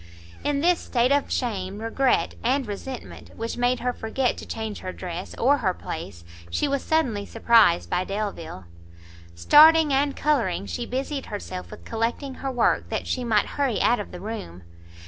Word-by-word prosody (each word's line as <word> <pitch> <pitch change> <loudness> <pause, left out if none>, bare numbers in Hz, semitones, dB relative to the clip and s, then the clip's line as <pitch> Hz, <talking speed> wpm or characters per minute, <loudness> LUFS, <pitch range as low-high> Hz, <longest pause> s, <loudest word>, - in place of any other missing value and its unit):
In 290 -1 0
this 350 +1 +3
state 245 +1 +1
of 285 0 +1
shame, 200 -6 -2
regret 225 +4 +1
and 260 +3 +1
resentment, 235 +5 -8
which 230 +1 -4
made 245 0 +1
her 250 0 0
forget 245 +3 -1
to - - -9
change 220 -2 -4
her 185 - -5
dress, 180 0 -6
or 280 +4 +3
her 190 -8 0
place, 160 - -7 0.3
she 295 - 0
was 280 -1 0
suddenly 255 -11 +1
surprised 220 -5 +4
by 180 +1 0
Delvile. 195 - -5 0.7
Starting 305 - +7
and 280 +1 +1
colouring, 240 - 0
she 90 -3 -4
busied 270 +2 -3
herself 185 -3 -6
with 215 - -12
collecting 235 +5 -2
her 270 - -2
work, 245 -3 +1
that - - -2
she 255 - -2
might 220 -3 +2
hurry 275 -6 -1
out 240 - +3
of 205 - -6
the 180 - -8
room. 175 - -7
230 Hz, 170 wpm, -25 LUFS, 200-270 Hz, 0.7 s, Starting